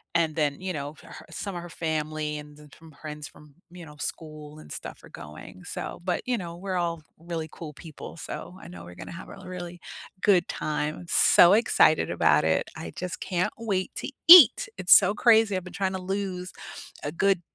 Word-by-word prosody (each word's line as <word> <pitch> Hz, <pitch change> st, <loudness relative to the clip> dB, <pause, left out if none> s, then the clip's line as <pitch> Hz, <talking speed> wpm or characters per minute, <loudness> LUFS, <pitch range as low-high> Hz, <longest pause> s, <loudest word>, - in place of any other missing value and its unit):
And 165 Hz, -2 st, +1 dB
then, 150 Hz, -1 st, 0 dB
you 185 Hz, -1 st, -4 dB
know, 145 Hz, +1 st, -6 dB
for -, -, -18 dB
her -, -, -12 dB
some 200 Hz, -2 st, -6 dB
of 175 Hz, -, -5 dB
her 175 Hz, -, -10 dB
family 155 Hz, -2 st, -3 dB
and 150 Hz, 0 st, -13 dB
then 150 Hz, 0 st, -16 dB
some 165 Hz, -1 st, -15 dB
friends 150 Hz, -1 st, -8 dB
from, 150 Hz, -2 st, -18 dB, 0.2 s
you 175 Hz, -1 st, -11 dB
know, 150 Hz, -1 st, -13 dB
school 155 Hz, -1 st, -7 dB
and 155 Hz, -, -13 dB
stuff -, -, -8 dB
are -, -, -14 dB
going, 75 Hz, +1 st, -11 dB
so -, -, -6 dB
but, 180 Hz, -1 st, -2 dB
you 250 Hz, -1 st, 0 dB
know, 170 Hz, -2 st, -7 dB
we're 190 Hz, 0 st, -4 dB
all 170 Hz, -2 st, -2 dB, 0.2 s
really 165 Hz, -1 st, -5 dB
cool 155 Hz, -3 st, -9 dB
people, 160 Hz, +1 st, -11 dB
so 180 Hz, -, -8 dB
I -, -, -12 dB
know 85 Hz, -1 st, -10 dB
we're 90 Hz, 0 st, -12 dB
gonna -, -, -9 dB
have 170 Hz, +1 st, -10 dB
a -, -, -12 dB
really 175 Hz, -1 st, -7 dB, 0.4 s
good 190 Hz, -4 st, +3 dB
time. 150 Hz, 0 st, -3 dB
I'm 175 Hz, -, -11 dB
so 175 Hz, +3 st, +6 dB
excited 235 Hz, +3 st, +3 dB
about -, -, +3 dB
it. -, -, 0 dB
I -, -, -7 dB
just 180 Hz, -1 st, -5 dB
can't 180 Hz, -1 st, -1 dB
wait 200 Hz, -5 st, -2 dB
to -, -, -4 dB, 0.2 s
eat! 335 Hz, -, +10 dB
It's 180 Hz, -1 st, +6 dB
so 195 Hz, 0 st, +2 dB
crazy. 220 Hz, -2 st, +4 dB
I've 185 Hz, -, -3 dB
been 185 Hz, -, -11 dB
trying 190 Hz, 0 st, -1 dB
to 190 Hz, -, -4 dB
lose 185 Hz, -1 st, -4 dB, 0.5 s
a 145 Hz, -, -3 dB
good 190 Hz, +1 st, +1 dB
170 Hz, 210 wpm, -26 LUFS, 155-185 Hz, 0.5 s, eat